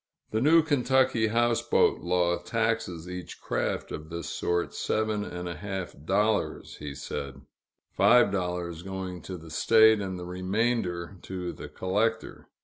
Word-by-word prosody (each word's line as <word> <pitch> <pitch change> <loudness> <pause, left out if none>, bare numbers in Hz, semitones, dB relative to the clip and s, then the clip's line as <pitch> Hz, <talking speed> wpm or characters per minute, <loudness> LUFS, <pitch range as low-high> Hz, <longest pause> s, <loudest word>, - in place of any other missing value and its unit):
The 110 - 0
new 160 +4 +6
Kentucky 130 -5 +2
houseboat 120 +1 +2
law 85 -1 +1
taxes 100 -3 -1
each 90 0 -7
craft - - -2
of 80 0 -6
this 85 0 -5
sort 85 0 -1
seven 110 -1 -1
and 90 -2 -6
a 85 - -3
half 95 0 -5
dollars, 105 +5 0
he 70 -2 -7
said: 70 -1 -5 0.5
five 120 -4 +5
dollars 90 -3 -2
going 95 -1 -5
to 90 +3 -7
the 80 -1 -12
State, 110 +5 +5
and 95 -2 -4
the 90 - -6
remainder 95 -1 -1
to 90 -2 -5
the - - -9
collector. 110 +5 -1
95 Hz, 145 wpm, -28 LUFS, 90-110 Hz, 0.5 s, new